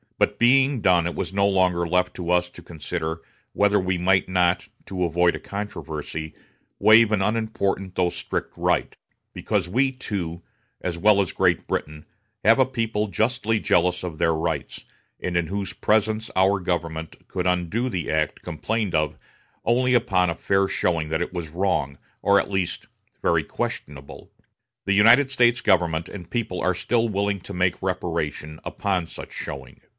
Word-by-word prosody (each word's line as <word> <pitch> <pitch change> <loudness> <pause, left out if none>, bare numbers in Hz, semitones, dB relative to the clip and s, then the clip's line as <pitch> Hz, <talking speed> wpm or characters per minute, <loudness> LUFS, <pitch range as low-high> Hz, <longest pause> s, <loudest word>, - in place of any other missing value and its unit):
But, - - +1
being 130 +1 +4
done, 90 -3 +4
it 85 - -4
was - - -4
no 100 0 +3
longer 90 -3 +2
left 90 +1 +1
to 85 -2 -5
us 90 0 +2
to - - -13
consider 80 -1 -5 0.3
whether 105 0 +3
we 95 -1 0
might 95 +1 +2
not, 90 -1 +2 0.2
to 90 -2 -2
avoid 85 +1 +2
a - - -6
controversy, 80 -6 -6 0.5
waive 110 0 +6
an 100 -3 +2
unimportant 100 -3 -1
though 90 - +2
a - - -2
strict - - -4
right; - - 0 0.4
because 100 -5 -1
we, 130 +7 +2
too, 90 -9 -5 0.4
as 85 -2 -3
well 100 +2 +4
as 95 - -2
Great - - +1
Britain, 75 0 -4 0.4
have 115 +4 +5
a 130 - +6
people 115 -4 -1
justly 115 +1 0
jealous 90 -3 +1
of 85 -4 -5
their 80 +1 +2
rights, 80 +1 -3 0.3
and 90 - -3
in 85 -2 0
whose 100 +2 -3
presence 110 +1 0
our 95 +1 +3
government 85 -3 -4
could 90 -1 -2
undo 90 +8 0
the 90 -8 -3
act 75 -1 -1
complained 95 +4 -2
of 75 0 0 0.5
only 125 +2 +2
upon 95 -7 +2
a 85 - -2
fair 95 +1 +1
showing 80 -4 0
that 80 +1 -1
it 90 - -3
was 85 -3 -4
wrong, 85 -5 -1 0.2
or 100 0 +4
at - - -3
least 95 -3 -2 0.4
very - - +2
questionable. 70 -1 -6 0.5
The 100 - +2
United 115 +7 +6
States 120 -2 +3
government 85 -4 +2
and 90 -4 -9
people 110 -7 -2
are 90 - +1
still 115 +6 +1
willing 100 -1 -1
to 100 - -9
make 90 -1 0
reparation 80 -4 -3
upon 95 -4 -2
such - - -10
showing. - - -7
95 Hz, 170 wpm, -24 LUFS, 85-105 Hz, 0.5 s, waive